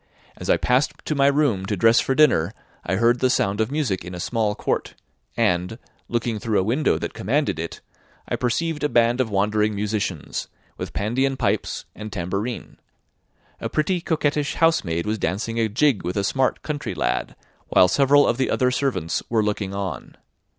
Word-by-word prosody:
As - - -7
I - - +5
passed 130 +4 +2
to - - 0
my 140 -1 +3
room 140 -10 +2
to 105 - -1
dress 115 +4 +5
for 135 - 0
dinner, 110 - +3 0.3
I 95 - -1
heard 115 +4 +3
the 130 - +3
sound 100 -3 +1
of 110 - 0
music 135 - -1
in 90 +1 -7
a - - -6
small 110 +1 0
court, - - -2 0.4
and, 90 +5 +1 0.3
looking 115 -2 -1
through 110 -1 +1
a - - +1
window 125 +10 +1
that - - -4
commanded 140 - 0
it, 85 0 -5 0.5
I - - -1
perceived 150 +6 -1
a 150 - +2
band 120 0 +3
of 120 - -1
wandering 105 +1 +1
musicians, 100 -5 -3 0.3
with - - -6
pandean 130 +6 0
pipes - - -1
and 110 0 -8
tambourine; 100 +6 -4 0.8
a - - -3
pretty, 170 +3 0
coquettish 150 -4 0
housemaid 90 - +2
was 110 0 -1
dancing 115 +7 -2
a 110 -1 +1
jig 130 +1 +2
with 90 +3 -3
a 100 - +1
smart 130 +6 0
country 145 - -4
lad, - - -1 0.3
while 90 - +5
several 140 +7 +4
of 115 - +1
the 130 - 0
other 125 -1 +2
servants 125 - -1
were 115 -2 +2
looking 105 -2 -2
on. 95 -4 -5
115 Hz, 180 wpm, -23 LUFS, 100-135 Hz, 0.8 s, I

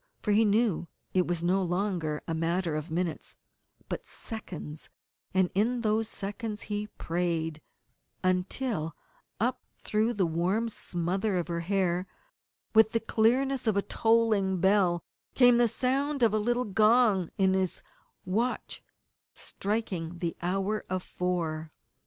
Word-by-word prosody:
For 210 - +1
he 220 +2 +5
knew 210 -5 +2 0.3
that 185 - +3
it 180 - +2
was 170 -1 -1
no 185 +3 +2
longer 175 -4 -1
a 165 - -1
matter 165 0 0
of 155 +2 -4
minutes, 170 0 -3 0.5
but - - -3
of - - -24
seconds, 175 -9 -8 0.4
and 185 -1 +2
in 235 +5 +1
those 220 0 +1
seconds 210 +1 -5
he 210 0 -3
prayed, 165 -4 -2 0.6
until 185 - -1 0.4
up 245 +4 0
through 220 +3 0
the 195 -3 +2
warm 180 +8 0
smother 185 +1 -1
of 175 - -1
her 170 0 -1
hair 180 0 0 0.7
with 220 0 +6
the 230 - +3
clearness 250 +4 +2
of 210 -2 +3
a 200 - +2
tolling 220 -4 +2
bell 185 -2 +3 0.3
came 245 -2 +6
the 240 - +5
sound 270 +4 0
of 225 - +5
the 215 - +1
little 240 +3 +1
gong 215 -2 +4
in 190 -2 +3
his 190 -2 -1 0.4
watch 225 +7 -1 0.5
striking 190 -5 -3
the 170 -1 -2
Hour 195 +4 -1
of 185 0 -2
Four! 165 -3 -2
195 Hz, 140 wpm, -29 LUFS, 175-220 Hz, 0.7 s, with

